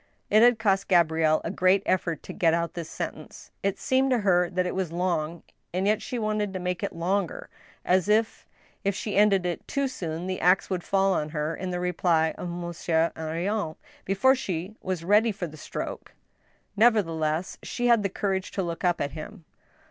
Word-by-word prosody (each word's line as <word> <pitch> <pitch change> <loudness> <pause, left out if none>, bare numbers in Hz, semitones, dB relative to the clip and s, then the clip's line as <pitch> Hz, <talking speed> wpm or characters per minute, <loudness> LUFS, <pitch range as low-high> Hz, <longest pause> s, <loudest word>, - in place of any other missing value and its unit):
It 215 - +6
had 240 0 +6
cost 200 -3 +1
Gabrielle 160 -3 +3
a 165 - -3
great 190 +1 +3
effort 170 -4 0
to - - -8
get 165 -2 +3
out 170 -1 -2
this 170 -2 -6
sentence. - - -7
It 195 0 -1
seemed 265 +1 +1
to 255 - +3
her 180 -3 +3
that 185 -1 0
it 180 - -2
was 185 -3 -2
long, 170 -2 -1 0.3
and 185 +1 0
yet 215 +1 +2
she 250 - -4
wanted 215 -3 -1
to 185 - -3
make 180 0 -2
it - - -3
longer, 180 +2 -2 0.4
as 185 +2 +2
if, 220 +1 +1 0.4
if 200 -1 0
she 210 - -3
ended 200 -2 +4
it 175 -1 -3
too 280 -1 0
soon, 170 -9 -5
the 185 0 -3
axe 180 +3 +3
would 180 -2 -1
fall 195 0 +2
on 155 -3 -1
her, 155 +1 -2
in 185 +2 -5
the 180 0 -2
reply 170 -2 +1
of 180 - -4
Monsieur 170 -1 -1
Henrion, 165 +3 -2 0.3
before 195 +8 +3
she 190 -6 -3
was 185 -3 -3
ready 210 +5 +4
for 195 -3 -4
the 155 -2 -9
stroke 155 - -6 0.6
Nevertheless, 175 -7 +2
she 245 - -3
had 235 -2 +5
the 200 - -1
courage 190 0 -2
to 195 - -1
look 170 -1 -5
up 175 -1 +1
at 140 - -1
him. 165 +4 -9
185 Hz, 195 wpm, -26 LUFS, 170-205 Hz, 0.6 s, It